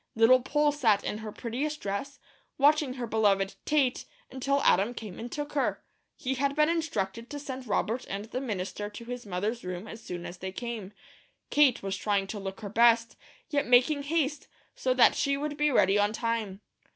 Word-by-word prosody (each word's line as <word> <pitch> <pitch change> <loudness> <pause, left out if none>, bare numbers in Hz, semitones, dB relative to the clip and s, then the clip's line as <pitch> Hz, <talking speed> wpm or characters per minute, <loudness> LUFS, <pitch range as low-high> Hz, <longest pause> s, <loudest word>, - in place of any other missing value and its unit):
Little 235 +3 +6
Poll 295 +3 +2
sat 225 -9 +2
in 210 - -3
her 220 -1 -6
prettiest 275 +8 -3
dress, 200 +8 -4 0.4
watching 290 -2 +3
her 250 -2 -3
beloved 205 -3 +2
"Tate," 280 -5 +2 0.3
until 275 +2 0
Adam 205 +7 +3
came 210 -6 -8
and 235 +1 -6
took 295 0 -5
her. 280 -2 0 0.3
He 265 -3 -2
had 275 +2 0
been 300 +1 +4
instructed 235 - -2
to 290 - -5
send 265 -3 -7
Robert 230 +4 -1
and 200 +2 -4
the 250 +3 -4
minister 205 -3 -4
to 215 +3 -10
his 245 -2 -6
mother's 205 +6 -2
room 180 +3 -5
as 220 +1 -9
soon 175 -1 -6
as 180 - -8
they 190 0 -5
came. 225 -2 -5 0.6
Kate 285 -7 +4
was 195 0 -2
trying 200 0 0
to 205 +2 -6
look 195 +1 -6
her 205 - -5
best, 230 +1 +4 0.4
yet 285 -1 +1
making 250 +4 +4
haste, 295 -1 -1 0.3
so - - 0
that - - +6
she 280 -1 0
would 295 +1 -3
be 295 0 +2
ready 200 -6 +4
on 205 +1 +2
time. 225 -4 -2
235 Hz, 190 wpm, -29 LUFS, 205-280 Hz, 0.6 s, Little